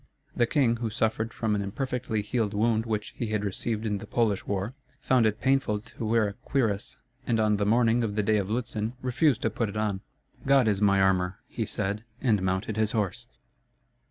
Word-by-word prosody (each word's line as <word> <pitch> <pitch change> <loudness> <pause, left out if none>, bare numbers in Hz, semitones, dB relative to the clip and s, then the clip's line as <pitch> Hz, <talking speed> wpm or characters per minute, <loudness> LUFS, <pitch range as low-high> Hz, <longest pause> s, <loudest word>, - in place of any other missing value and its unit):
The 120 - +3
king, 120 -4 +2
who 115 -1 -2
suffered 110 0 0
from 110 -2 -1
an 105 - 0
imperfectly 120 +1 -2
healed 105 -1 -1
wound 110 +1 +1
which 105 -2 -2
he 120 - -3
had 105 -1 -1
received 110 +3 -2
in 105 -2 -1
the 105 - -9
Polish 110 -5 0
war, 100 +4 -2 0.3
found 130 -4 +3
it 105 0 -1
painful 135 -5 +2
to 115 - -10
wear 110 -1 +3
a 100 - -5
cuirass; 110 -5 -1 0.3
and 115 -2 +2
on 105 -1 +3
the 100 0 0
morning 115 +1 +3
of 105 -3 -2
the 105 - +1
day 110 +1 +3
of 100 -1 -1
Lutzen 110 -1 -2
refused 130 0 +2
to 115 - +1
put 110 0 -1
it 105 - -6
on. 105 -3 -1 0.4
"God 135 -3 +4
is 100 -2 +1
my 100 -1 +4
armor," 95 -1 +2
he - - -3
said, 100 +3 -2 0.2
and 110 -7 +2
mounted 95 +3 -1
his 110 -1 +1
horse. 105 -5 -1
110 Hz, 205 wpm, -27 LUFS, 105-115 Hz, 0.4 s, God